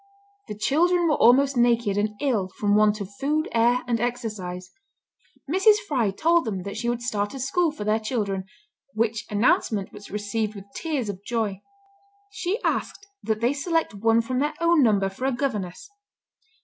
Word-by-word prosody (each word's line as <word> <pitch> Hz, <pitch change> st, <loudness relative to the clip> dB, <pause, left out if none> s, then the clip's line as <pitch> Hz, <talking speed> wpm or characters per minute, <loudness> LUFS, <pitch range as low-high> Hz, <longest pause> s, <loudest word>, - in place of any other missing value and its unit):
The 210 Hz, -, -6 dB
children 345 Hz, +9 st, +2 dB
were 310 Hz, -, +3 dB
almost 270 Hz, +3 st, +5 dB
naked, 235 Hz, -4 st, +2 dB
and 210 Hz, +1 st, -1 dB
ill 225 Hz, -10 st, 0 dB
from 205 Hz, -1 st, +1 dB
want 210 Hz, 0 st, +3 dB
of 200 Hz, 0 st, -7 dB
food, 305 Hz, +3 st, 0 dB
air, 235 Hz, +2 st, +2 dB
and 235 Hz, -2 st, 0 dB
exercise. 215 Hz, -7 st, -4 dB, 0.8 s
Mrs. 385 Hz, +8 st, +5 dB
Fry 245 Hz, -8 st, +1 dB
told 330 Hz, -, +2 dB
them 195 Hz, -5 st, -3 dB
that 200 Hz, +1 st, -6 dB
she 240 Hz, -, -2 dB
would 240 Hz, 0 st, -2 dB
start 205 Hz, -2 st, -2 dB
a -, -, -6 dB
school 320 Hz, +7 st, +1 dB
for 295 Hz, -8 st, -6 dB
their 215 Hz, +1 st, +1 dB
children, 210 Hz, -4 st, -2 dB, 0.5 s
which 225 Hz, 0 st, -1 dB
announcement 210 Hz, -2 st, +1 dB
was 205 Hz, -1 st, -11 dB
received 210 Hz, +1 st, -3 dB
with 195 Hz, -1 st, -9 dB
tears 295 Hz, -8 st, -2 dB
of 200 Hz, -1 st, -6 dB
joy. 215 Hz, -4 st, -2 dB, 0.7 s
She 390 Hz, +2 st, -2 dB
asked 400 Hz, -, -2 dB, 0.2 s
that 220 Hz, -1 st, -2 dB
they 240 Hz, +4 st, +2 dB
select 325 Hz, -, -1 dB
one 225 Hz, +3 st, +2 dB
from 250 Hz, +2 st, -2 dB
their 295 Hz, +2 st, -1 dB
own 335 Hz, -2 st, +4 dB
number 205 Hz, -6 st, +3 dB
for 195 Hz, +7 st, -5 dB
a 270 Hz, -, +2 dB
governess. 220 Hz, -9 st, -3 dB
230 Hz, 175 wpm, -24 LUFS, 205-275 Hz, 0.8 s, almost